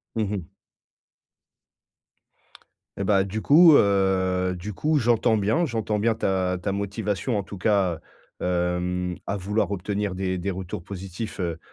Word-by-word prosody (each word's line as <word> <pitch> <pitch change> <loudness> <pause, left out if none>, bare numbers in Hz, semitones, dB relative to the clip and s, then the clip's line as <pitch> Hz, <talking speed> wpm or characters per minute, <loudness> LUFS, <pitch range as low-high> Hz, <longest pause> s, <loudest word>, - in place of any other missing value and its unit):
Mmh 110 -3 -1
mh. 95 -4 -4 2.5
Eh 100 - -2
bah 95 -1 +3
du 105 +3 -4
coup 160 +1 +7
heu 95 -3 +2
du 105 +4 -6
coup 150 +9 +1
j'entends 120 -2 +2
bien 110 - +1
j'entends 110 -4 -2
bien 115 +2 +2
ta 95 -3 0
ta 100 +2 -2
motivation 100 +3 -2
en 100 - -1
tout 100 - -9
cas, 95 -6 +1 0.4
hem, 90 0 -1
à 100 - -2
vouloir 105 +3 -1
obtenir 100 0 -2
des 95 -1 -1
des 95 +3 -2
retours 90 -2 -5
positifs, 95 +3 -7
heu, 85 -2 -2
100 Hz, 145 wpm, -25 LUFS, 90-105 Hz, 2.5 s, coup